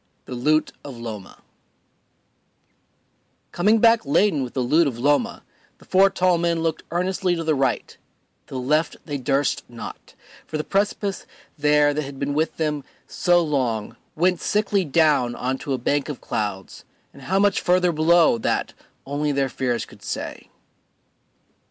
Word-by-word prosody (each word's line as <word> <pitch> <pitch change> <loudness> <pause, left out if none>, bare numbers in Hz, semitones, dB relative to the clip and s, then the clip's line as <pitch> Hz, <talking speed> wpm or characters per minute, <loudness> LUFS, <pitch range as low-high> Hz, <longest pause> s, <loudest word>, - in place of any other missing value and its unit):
The - - -7
Loot 150 +6 +1
of 135 -4 -9
Loma 110 -5 -8 2.1
Coming 210 +6 +3
back 230 0 +4
laden 155 +2 +2
with 125 -2 -5
the 130 - 0
loot 155 +6 +3
of 125 -4 -4
Loma, 145 - +1 0.3
the - - -19
four 195 +1 +5
tall 180 -2 +2
men 170 -1 0
looked 165 -1 -1
earnestly 180 +1 0
to 165 - -3
the 160 -1 +1
right; 135 -3 -1 0.5
to - - -9
the - - -2
left 150 +6 +1
they 145 -3 -4
durst 135 +1 0
not, 120 -1 -10 0.3
for 155 - -3
the 155 - -2
precipice 200 0 -1 0.3
there 150 -1 +3
that 150 - -1
had 140 -1 -8
been 140 +1 -2
with 155 +2 -1
them 150 -3 -1 0.2
so 175 -1 +2
long 120 -8 -1 0.2
went 180 +2 +1
sickly 205 -2 +1
down 145 -6 +2
on 130 +1 -2
to 140 - -5
a 135 - +1
bank 140 +4 -1
of 145 - -5
clouds, 100 -3 -4 0.3
and 140 - -14
how 185 +9 -1
much 200 0 +3
further 180 0 +3
below 160 -4 +4
that - - -1 0.3
only 145 +2 -1
their 135 -1 0
fears 125 -3 -2
could - - -17
say. - - -6
150 Hz, 160 wpm, -23 LUFS, 135-175 Hz, 2.1 s, four